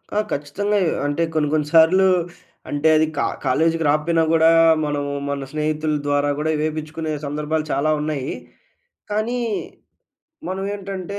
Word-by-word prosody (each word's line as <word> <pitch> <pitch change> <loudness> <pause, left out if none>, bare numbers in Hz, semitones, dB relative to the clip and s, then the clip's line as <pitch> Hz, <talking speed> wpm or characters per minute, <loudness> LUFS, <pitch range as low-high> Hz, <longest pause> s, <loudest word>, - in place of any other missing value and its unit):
ఆ! - - +3
ఖచ్చితంగా 200 +9 -1
ఎ - - +1 0.2
అంటే 145 +3 0
కొన్ని 155 -2 +1
కొన్ని 150 -1 +1
సార్లు 170 +4 +6 0.6
అంటే 145 +2 0
అది 155 - +4
కా - - +1 0.2
కాలేజీకి 165 +5 +1
రాకపోయినా 160 +3 +2
గూడా 165 0 +5 0.4
మనం 145 -1 -2 0.3
మన 140 -1 -3
స్నేహితుల 155 0 -1
ద్వారా 145 0 +1
కూడా 155 +1 -1
ఇవేపిచ్చుకునే 155 +1 -3
సందర్భాలు 150 +2 -2
చాలావున్నాయీ. 150 -1 -1 0.8
కానీ 225 +4 -1 1.1
మనమేంటంటే 195 0 -4
155 Hz, 125 wpm, -21 LUFS, 150-170 Hz, 1.1 s, సార్లు